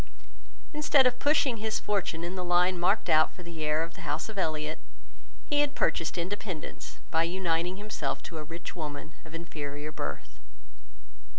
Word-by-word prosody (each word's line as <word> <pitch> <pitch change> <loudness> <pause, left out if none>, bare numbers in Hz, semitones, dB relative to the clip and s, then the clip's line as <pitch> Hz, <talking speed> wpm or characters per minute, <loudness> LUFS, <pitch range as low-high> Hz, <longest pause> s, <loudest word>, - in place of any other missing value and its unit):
Instead 295 -2 +5
of 250 0 +3
pushing 285 -5 +4
his 220 +1 0
fortune 190 -5 -1
in 175 +1 -2
the 185 -1 -2
line 180 +1 +3
marked 190 +5 +3
out 155 0 +6
for 180 - -11
the 170 -2 -6
heir 155 +1 +2
of 165 +1 -6
the - - -11
house 160 +8 -2
of 215 - -7
Elliot, 155 -2 0 0.7
he 290 0 +3
had 290 0 +1
purchased 165 +1 +1
independence 180 -1 -4
by 160 - +4
uniting 175 0 +1
himself 205 -9 -3
to 160 - -6
a - - -4
rich 165 +3 -7
woman 150 -2 -5
of 160 0 -10
inferior 150 -3 -5
birth. 70 - -5
170 Hz, 170 wpm, -30 LUFS, 155-205 Hz, 0.7 s, out